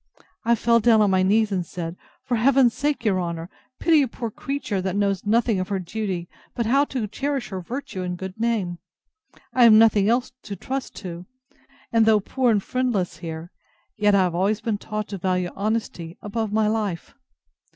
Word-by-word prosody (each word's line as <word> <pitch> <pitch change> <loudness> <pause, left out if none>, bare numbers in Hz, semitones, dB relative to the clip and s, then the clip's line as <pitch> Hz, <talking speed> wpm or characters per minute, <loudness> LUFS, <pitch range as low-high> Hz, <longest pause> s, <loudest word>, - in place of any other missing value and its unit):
I 235 +1 +3
fell 230 +1 +3
down 225 0 +5
on 205 -2 +3
my 185 0 +3
knees, 210 +3 +3
and 185 -2 0
said, 170 0 -6 0.3
For 255 -2 -1
Heaven's 250 0 +4
sake, 285 -4 -1
your 190 -4 +2
honour, 170 0 -5 0.3
pity 320 -3 +4
a 270 - +1
poor 230 -1 -5
creature, 250 -6 -3
that 185 0 -2
knows 200 +1 0
nothing 225 -1 +2
of 185 - -2
her 200 -1 -1
duty, 185 -1 -4 0.3
but 235 - -1
how 275 +5 +3
to 255 -6 -3
cherish 270 +3 -3
her 190 -2 -5
virtue 230 -1 -6
and 180 -1 -3
good 190 +3 -7
name: 210 -7 -1 0.7
I 255 - +2
have 230 -2 +8
nothing 215 -2 +5
else 245 +2 +1
to 200 - -7
trust 265 +5 -5
to: 175 0 -7 0.7
and, 225 -1 +4
though 220 -1 +5
poor 250 +5 0
and 210 -4 +2
friendless 240 -10 -1
here, 165 0 -7 0.4
yet 210 -2 +3
I 195 - +5
have 180 -2 0
always 195 +5 +1
been 220 -2 -2
taught 215 0 -4
to 200 -2 -5
value 180 -1 0
honesty 200 -5 -3
above 215 0 -3
my 215 0 +2
life. 210 -6 -2
210 Hz, 195 wpm, -23 LUFS, 185-235 Hz, 0.7 s, have